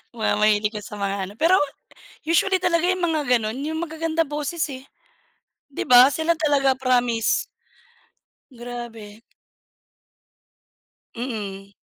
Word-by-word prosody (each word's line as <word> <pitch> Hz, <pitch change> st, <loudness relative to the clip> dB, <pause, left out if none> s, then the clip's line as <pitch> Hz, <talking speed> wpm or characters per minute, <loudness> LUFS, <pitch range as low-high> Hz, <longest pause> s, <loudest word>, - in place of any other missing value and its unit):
Wow. 220 Hz, -2 st, 0 dB
Mahilig 210 Hz, 0 st, +3 dB
ka 215 Hz, -, -5 dB
sa 210 Hz, -, -9 dB
mga 200 Hz, -1 st, -3 dB
ano. 200 Hz, -, -11 dB
Pero 335 Hz, -, +4 dB, 0.6 s
usually 355 Hz, +4 st, +1 dB
talaga 345 Hz, -1 st, +2 dB
yung 370 Hz, 0 st, 0 dB
mga 325 Hz, -3 st, +1 dB, 0.2 s
ganun, 220 Hz, +2 st, -4 dB
yung 320 Hz, +1 st, -3 dB
magagandang 325 Hz, -1 st, -2 dB
boses 300 Hz, +3 st, -3 dB
eh. 265 Hz, 0 st, -9 dB, 0.8 s
'Di 280 Hz, -, -4 dB
ba 250 Hz, +1 st, +8 dB
sila 320 Hz, +3 st, 0 dB
talaga 285 Hz, -4 st, +2 dB
promise. 245 Hz, -3 st, +1 dB, 1.1 s
Grabe. 235 Hz, -3 st, -9 dB, 1.9 s
Mm. 200 Hz, -5 st, -6 dB
260 Hz, 115 wpm, -23 LUFS, 220-320 Hz, 1.9 s, ba